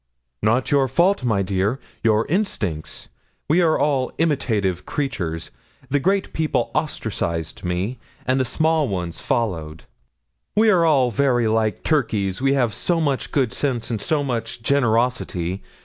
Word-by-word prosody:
'"Not 115 +6 +1
your 140 -2 +4
fault, 175 +5 +2
my 110 -5 +1
dear 100 +6 0 0.2
your 110 -1 +3
instinct. 110 - -2 0.4
We 165 +5 +4
are 160 -2 +3
all 135 -3 +1
imitative 105 - 0
creatures: 90 - -3 0.4
the 145 - +3
great 195 +6 0
people 160 -1 0
ostracised 85 -1 -2
me, 95 +7 -2 0.3
and 130 +1 +2
the - - +3
small 155 +4 +1
ones 90 -4 -4
followed. 80 -9 -2 0.7
We 215 +1 +5
are 155 -9 +4
very 120 -1 +2
like 110 0 0
turkeys, 110 - 0
we 135 0 +3
have 120 -5 +1
so 175 -2 0
much 145 -5 0
good 130 -5 +1
sense 125 -5 -2
and 110 -3 -2
so 150 +6 0
much 115 -3 -3
generosity. 115 -8 +1
125 Hz, 140 wpm, -22 LUFS, 100-145 Hz, 0.7 s, We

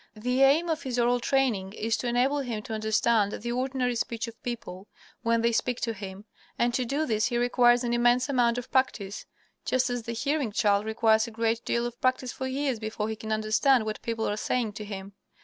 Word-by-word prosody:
The 250 +5 0
aim 285 +6 +5
of 320 -1 -1
his 255 -4 -3
oral 245 +1 +3
training 235 -7 0
is 220 +1 -1
to 250 - -3
enable 250 +4 +2
him 235 -6 -4
to 220 - -6
understand 220 -1 +2
the 235 +2 -4
ordinary 255 0 -1
speech 230 0 -2
of 230 0 -11
people 205 -5 -6 0.3
when 230 0 +1
they 235 - +3
speak 245 +1 0
to 230 - -1
him, 195 0 -8 0.3
and 240 0 +1
to 250 0 0
do 285 +6 -1
this 215 -5 +1
he 240 - -1
requires 245 0 +4
an 240 -1 -1
immense 240 +2 +3
amount 245 -4 +2
of 245 0 -6
practice, 225 -6 -1 0.4
just 255 0 +1
as 245 -1 -2
the 235 +1 -5
hearing 280 0 -1
child 205 -1 +2
requires 220 0 +3
a - - -6
great 230 0 -1
deal 235 0 0
of 240 0 -6
practice 255 -1 +1
for 260 - -4
years 265 -2 -1
before 215 -1 -3
he 220 - -3
can 220 0 -7
understand 220 +3 +3
what 215 0 -4
people 225 -1 -2
are 205 - -1
saying 225 -1 -1
to 210 +1 -7
him. 200 -1 -7
235 Hz, 220 wpm, -27 LUFS, 220-250 Hz, 0.4 s, aim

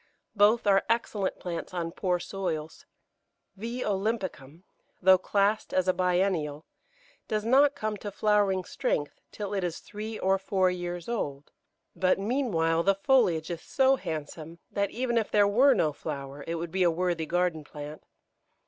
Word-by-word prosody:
Both 210 +3 +4
are 195 -1 +4
excellent 220 -4 0
plants 175 +1 -5
on 170 -1 -2
poor 180 0 -1
soils. 165 -5 -5 0.7
V. 235 +5 -4
olympicum, 190 - -3 0.4
though 185 0 +6
classed 200 +3 0
as 185 0 +2
a 185 - +4
biennial, 180 -5 0 0.6
does 215 0 -1
not 275 +4 +5
come 215 0 -2
to 205 +1 -6
flowering 200 -2 +2
strength 145 -4 -2
till 205 -1 -5
it 195 -2 -1
is 175 -2 -2
three 215 +1 -7
or 190 +1 +1
four 190 -1 +1
years 175 -1 -5
old; 145 -12 -4 0.4
but 185 -1 +2
meanwhile 195 -8 +1
the 195 +3 +3
foliage 190 - +2
is 170 -1 -5
so 265 0 +3
handsome 160 - -6
that 200 -1 0
even 240 0 0
if 220 - -3
there 205 -1 +4
were 255 +7 +5
no 155 -2 +1
flower 140 0 -6
it 165 - -2
would 165 0 -4
be 190 - -1
a 175 - +5
worthy 170 -1 -1
garden 175 -2 0
plant. 150 +1 -9
185 Hz, 155 wpm, -28 LUFS, 165-210 Hz, 0.7 s, though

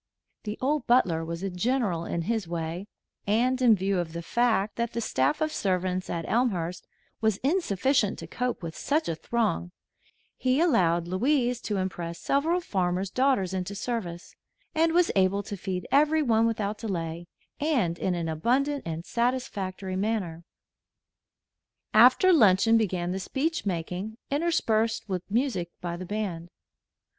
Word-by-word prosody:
The 210 +1 -4
old 280 0 0
butler 185 -10 +3
was 170 +2 -5
a 195 - -2
general 185 -3 0
in 170 - -2
his 220 -1 -1
way, 170 +3 -4 0.4
and 250 +5 +2
in 235 -3 +6
view 195 -1 0
of 165 -2 -3
the 170 0 -5
fact 220 0 +1
that 235 0 -2
the 235 - -2
staff 300 +6 0
of 310 0 +1
servants 185 -3 -1
at 165 -1 -3
Elmhurst 180 -8 0 0.3
was 220 -3 +2
insufficient 265 - +1
to - - -7
cope 250 -5 -3
with 160 -1 -5
such 310 +3 0
a - - 0
throng, 160 - -1 0.7
he 255 +2 +1
allowed 175 - +3
Louise 245 +5 +1
to 210 - -2
impress 175 -3 -3
several 320 - +1
farmers' 185 - -1
daughters 255 -9 +1
into 190 +1 -3
service, 200 -6 -4 0.4
and 325 0 +3
was 350 +1 +3
able 195 +1 +2
to 205 - -6
feed 185 -2 -4
everyone 285 -6 +4
without 210 -2 -2
delay 170 -5 -4 0.3
and 245 - 0
in 185 -2 0
an 170 -1 -2
abundant 260 - +1
and 165 +1 -4
satisfactory 205 -7 -2
manner. 190 -5 -2 1.5
After 255 +12 +7
luncheon 225 - +5
began 185 -5 0
the 190 - -2
speech 280 - -2
making, 185 +4 -3
interspersed 225 -8 +1
with 185 -3 -2
music 215 -6 0
by 175 -1 -4
the 180 +1 -7
band. 185 -5 -3
205 Hz, 150 wpm, -27 LUFS, 180-250 Hz, 1.5 s, After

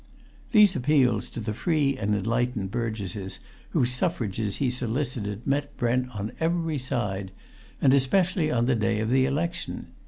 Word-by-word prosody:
These 210 -5 +6
appeals 130 -5 +2
to - - -7
the 105 -1 -3
free 145 +1 +1
and 105 -4 0
enlightened 115 -1 -1
burgesses 100 -4 -4 0.3
whose 125 0 +1
suffrages 110 - -1
he 130 -3 0
solicited 120 -4 -2
met 140 +1 -1
Brent 125 +1 +1
on 105 +1 -3
every 165 -2 0
side, 100 -7 -2 0.5
and 135 - +4
especially 160 +5 +2
on 120 -5 +1
the 130 - +3
day 110 -1 +1
of 110 +1 -1
the 130 0 +4
election. 170 +5 -3
125 Hz, 150 wpm, -26 LUFS, 110-145 Hz, 0.5 s, These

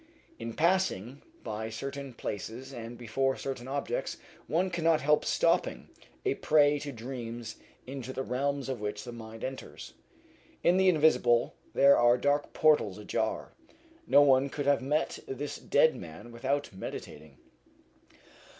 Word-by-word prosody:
In 115 0 -5
passing 155 - +1 0.2
by 110 +1 -4
certain 135 +3 -6
places 120 +7 -6
and 120 -1 -7
before 135 +3 0
certain 130 -2 -5
objects 145 - -2 0.3
one 180 +3 +1
cannot 165 -2 +2
help 150 +2 +3
stopping - - +1 0.4
a - - +2
prey 150 -1 +3
to 145 0 -5
dreams 120 -2 -6 0.3
into 130 -1 -6
the 130 - -3
realms 140 +2 -1
of 130 -4 -4
which 105 0 -3
the 120 - -7
mind 115 -1 -9
enters. 130 0 -7 0.7
In 175 +2 +4
the 190 0 +5
invisible 150 -8 +3 0.2
there 140 0 +7
are 120 +1 +5
dark 145 +3 +1
portals 150 -11 +3
ajar. 110 +1 -2 0.5
No 145 - +7
one 135 0 +4
could 145 +1 -4
have 140 -1 +3
met 150 +4 0
this 140 +2 -4
dead 155 +2 +3
man 85 +7 -10
without 135 +2 -2
meditating. 75 -6 -8
135 Hz, 140 wpm, -30 LUFS, 115-145 Hz, 0.7 s, there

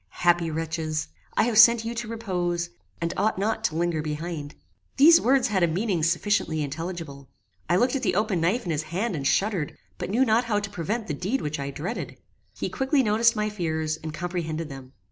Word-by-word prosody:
Happy 175 -1 +4
wretches! 160 - -3 0.3
I - - +5
have 225 -2 +3
sent 235 0 +7
you 230 - -2
to 235 -1 -4
repose, 180 -6 -2 0.3
and 170 0 -2
ought 215 -1 +1
not 215 +3 -1
to 155 - 0
linger 170 -1 0
behind." 155 -1 -5 0.4
These 320 +5 +8
words 260 0 +3
had 195 -3 +1
a 170 - +5
meaning 180 +1 0
sufficiently 165 -1 +1
intelligible. 155 -2 -6 0.4
I 175 - +4
looked 245 +8 +2
at 270 - -1
the 225 - 0
open 205 -4 +1
knife 195 +9 +1
in 170 - -1
his 150 -1 0
hand 195 +4 -1
and 140 -3 -1
shuddered, 180 +1 0 0.2
but - - -4
knew 240 +7 +3
not 230 +1 +3
how 210 -3 +1
to 205 -1 -5
prevent 210 +7 -3
the 150 - -3
deed 190 - -1
which 150 0 -3
I 140 0 -3
dreaded. 150 +6 -5 0.4
He - - -2
quickly 265 +1 +1
noticed 230 +2 +3
my 210 0 0
fears, 160 -6 -2
and 160 0 -6
comprehended 165 -2 -3
them. 135 -1 -10
175 Hz, 200 wpm, -26 LUFS, 160-220 Hz, 0.4 s, These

